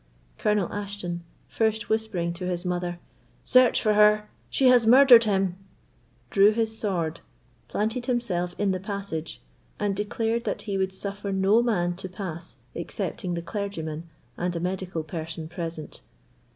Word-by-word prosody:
Colonel 210 Hz, -4 st, +1 dB
Ashton, 200 Hz, -4 st, -4 dB, 0.2 s
first 220 Hz, 0 st, 0 dB
whispering 220 Hz, -6 st, -1 dB
to 180 Hz, +1 st, -5 dB
his 180 Hz, 0 st, -2 dB
mother, 175 Hz, -1 st, -2 dB, 0.5 s
"Search 255 Hz, -1 st, +5 dB
for 215 Hz, -2 st, +3 dB
her; 210 Hz, 0 st, +4 dB, 0.2 s
she 270 Hz, -, +1 dB
has 245 Hz, -3 st, +5 dB
murdered 245 Hz, -1 st, +8 dB
him!" 195 Hz, -3 st, +1 dB, 0.7 s
drew 200 Hz, +1 st, +6 dB
his 220 Hz, 0 st, 0 dB
sword, 170 Hz, -7 st, -2 dB, 0.5 s
planted 225 Hz, +4 st, -2 dB
himself 180 Hz, -8 st, -1 dB
in 205 Hz, -1 st, +1 dB
the 185 Hz, -, -1 dB
passage, 190 Hz, -, -5 dB, 0.4 s
and 205 Hz, -1 st, 0 dB
declared 225 Hz, +3 st, -1 dB, 0.2 s
he 200 Hz, -3 st, -3 dB
would 190 Hz, 0 st, -1 dB
suffer 200 Hz, +1 st, -4 dB
no 195 Hz, +4 st, +4 dB
man 175 Hz, -7 st, 0 dB
to 190 Hz, 0 st, -7 dB
pass 175 Hz, -3 st, -7 dB, 0.2 s
excepting 180 Hz, -4 st, -3 dB
the 170 Hz, -, -4 dB
clergyman 170 Hz, -5 st, -5 dB, 0.3 s
and 175 Hz, 0 st, -2 dB
a -, -, -1 dB
medical 180 Hz, -2 st, -3 dB
person 160 Hz, -1 st, -6 dB
present. 165 Hz, -2 st, -6 dB
195 Hz, 140 wpm, -26 LUFS, 175-215 Hz, 0.7 s, murdered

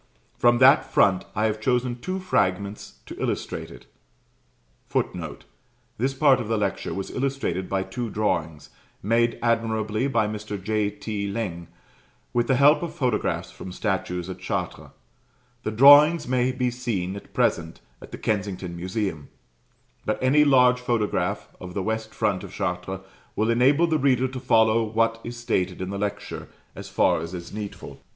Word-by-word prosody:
From 120 Hz, 0 st, +4 dB
that 130 Hz, +3 st, +5 dB
front 95 Hz, -2 st, +3 dB
I 105 Hz, -, +1 dB
have 110 Hz, 0 st, -1 dB
chosen 125 Hz, 0 st, 0 dB
two 185 Hz, +9 st, -3 dB
fragments 100 Hz, -, -1 dB
to -, -, -9 dB
illustrate -, -, -3 dB
it. -, -, -13 dB, 1.0 s
[Footnote: -, -, -3 dB, 0.5 s
This 135 Hz, +3 st, 0 dB
part 135 Hz, -1 st, +4 dB
of 120 Hz, -, -4 dB
the 110 Hz, 0 st, 0 dB
lecture 100 Hz, -2 st, -2 dB
was 95 Hz, 0 st, -4 dB
illustrated 130 Hz, -9 st, -2 dB
by 95 Hz, -1 st, 0 dB
two 120 Hz, +3 st, -5 dB
drawings, 85 Hz, -8 st, -2 dB, 0.3 s
made 115 Hz, +3 st, +2 dB
admirably 110 Hz, 0 st, 0 dB
by 115 Hz, -6 st, +1 dB
Mr. 105 Hz, -1 st, -5 dB
J. 105 Hz, +1 st, 0 dB
T. 105 Hz, -1 st, -4 dB
Laing, 100 Hz, -5 st, -4 dB, 0.7 s
with 120 Hz, 0 st, +1 dB
the 130 Hz, -, +3 dB
help 145 Hz, +3 st, +5 dB
of 170 Hz, -, -5 dB
photographs 125 Hz, -5 st, -1 dB
from 95 Hz, -, -9 dB
statues 90 Hz, -3 st, -2 dB
at 95 Hz, -, -7 dB
Chartres. -, -, -4 dB, 0.7 s
The -, -, -3 dB
drawings 145 Hz, +8 st, +7 dB
may 125 Hz, 0 st, +1 dB
be 125 Hz, -1 st, -1 dB
seen 110 Hz, -7 st, -3 dB
at 100 Hz, -, -10 dB
present -, -, 0 dB, 0.2 s
at -, -, -12 dB
the -, -, -6 dB
Kensington 95 Hz, -4 st, -2 dB
Museum: 90 Hz, -3 st, -3 dB, 0.7 s
but 110 Hz, -, -1 dB
any 140 Hz, +4 st, +4 dB
large 125 Hz, -3 st, +5 dB
photograph 120 Hz, -4 st, -1 dB
of 90 Hz, -1 st, -9 dB
the 100 Hz, -, -1 dB
west 110 Hz, +1 st, -3 dB
front 100 Hz, -4 st, -1 dB
of 95 Hz, -, -9 dB
Chartres 90 Hz, +1 st, -3 dB, 0.3 s
will 110 Hz, +2 st, +1 dB
enable 135 Hz, +8 st, +4 dB
the 160 Hz, -2 st, +1 dB
reader 130 Hz, -1 st, +2 dB
to 130 Hz, 0 st, -6 dB
follow 115 Hz, -2 st, +3 dB
what 115 Hz, +1 st, 0 dB
is 120 Hz, +1 st, -7 dB
stated 95 Hz, -6 st, -1 dB
in 95 Hz, +1 st, -4 dB
the 100 Hz, -, -4 dB
lecture, 100 Hz, 0 st, -4 dB, 0.3 s
as -, -, -8 dB
far -, -, +2 dB
as 85 Hz, +3 st, -6 dB
is 85 Hz, -1 st, -8 dB
needful. 105 Hz, -1 st, -7 dB
110 Hz, 160 wpm, -25 LUFS, 100-125 Hz, 1.0 s, drawings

